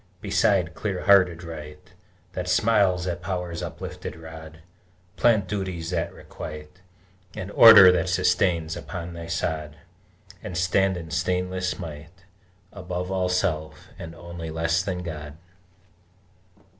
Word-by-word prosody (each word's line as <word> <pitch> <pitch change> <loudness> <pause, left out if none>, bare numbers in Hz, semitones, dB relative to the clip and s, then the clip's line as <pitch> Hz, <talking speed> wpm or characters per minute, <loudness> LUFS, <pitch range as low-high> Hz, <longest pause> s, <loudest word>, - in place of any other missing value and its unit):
Beside 90 -4 +1
clear 95 -2 -4
hearted 90 -4 +4
Right 75 -3 -10 0.4
That 90 0 -4
smiles 95 -2 +2
at 90 -1 -3
Power's 90 -2 -4
uplifted - - -7
rod, 80 0 -11 0.5
Plant 110 -5 +3
Duties 95 -4 -4
that 90 - -1
requite, 75 +4 -10 0.5
And 95 +2 -6
Order 105 -5 +10
that 85 -1 0
sustains, 85 -2 +1
upon 85 +2 -7
thy 85 -1 -8
sod, 80 -2 -3 0.7
And 90 - -6
stand 95 +1 +2
in 80 -2 -8
stainless 90 +3 -1
might 85 +2 -10 0.5
Above 90 -1 -5
all 95 -1 0
self, 80 0 -2
and 85 -2 -8
only 85 -1 -8
less 80 +2 0
than 90 -1 -4
God! 75 -3 -7
90 Hz, 120 wpm, -25 LUFS, 80-90 Hz, 0.7 s, Order